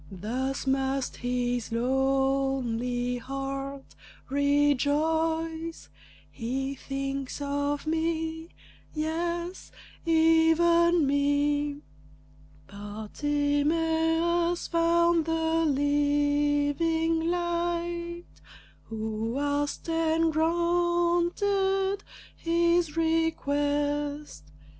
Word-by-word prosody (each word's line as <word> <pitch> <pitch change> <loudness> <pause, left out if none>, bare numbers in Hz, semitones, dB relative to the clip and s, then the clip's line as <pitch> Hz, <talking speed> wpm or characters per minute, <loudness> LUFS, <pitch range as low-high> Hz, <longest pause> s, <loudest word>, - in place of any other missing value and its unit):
Thus 250 +10 -3
must 270 0 -1
his 245 -1 -2
lonely 255 -1 0
heart 275 +1 -5 0.4
rejoice, 320 +4 +1 0.4
"He 265 +3 -3
thinks 275 0 -4
of 285 +1 -2
me; 320 0 -2 0.5
yes, 340 +3 -3 0.3
even 330 +1 +4
me!" 285 +1 +1 0.8
Bartimæus 315 +10 0
found 335 -1 +3
the 325 0 +1
Living 290 +3 +1
Light 345 0 -2 0.6
Who 220 +2 -3
asked 290 +2 -1
and 325 0 +1
granted 345 +4 +1 0.4
his 340 -1 +1
request. 290 - -1
295 Hz, 60 wpm, -27 LUFS, 275-330 Hz, 0.8 s, even